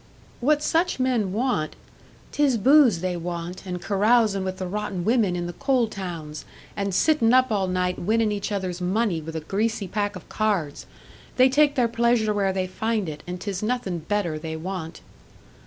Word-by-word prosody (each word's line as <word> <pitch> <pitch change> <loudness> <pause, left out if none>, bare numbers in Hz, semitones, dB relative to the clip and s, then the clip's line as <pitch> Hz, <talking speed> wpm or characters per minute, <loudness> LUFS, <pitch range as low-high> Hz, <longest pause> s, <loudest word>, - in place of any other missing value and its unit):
"What 295 +4 +2
such 330 -2 +1
men 245 -7 +1
want 215 -8 -1 0.3
" - - -26
"'Tis 285 -5 +2
booze 250 - +5
they 185 -1 -1
want, 175 +2 -5
and 180 -1 -3
carousin' 210 0 +2
with 185 0 -4
the 185 - -4
rotten 195 -2 -3
women 220 -6 +2
in 175 0 -3
the 175 - -5
coal 265 -1 +1
towns, 170 -7 -6 0.3
and 200 -1 -2
sittin' 240 - +3
up 255 -1 +4
all 195 -3 +1
night 180 0 -1
winnin' 220 +3 +1
each 205 0 -3
other's 185 -3 -3
money 185 -1 0
with 160 +1 -8
a 160 - -3
greasy 210 +4 -1
pack 205 +2 -2
of 185 - -10
cards! 195 -10 -1 0.5
They 255 +1 +6
take 290 +2 +3
their 245 -4 +3
pleasure 230 -2 +2
where 200 -2 +1
they 190 -1 -1
find 220 +1 -2
it, 150 -1 -6
and 180 0 -5
'tis 195 -1 -4
nothin' 215 -6 -2
better 170 -2 -2
they 160 0 -5
want." 165 0 -6
200 Hz, 185 wpm, -24 LUFS, 180-230 Hz, 0.5 s, They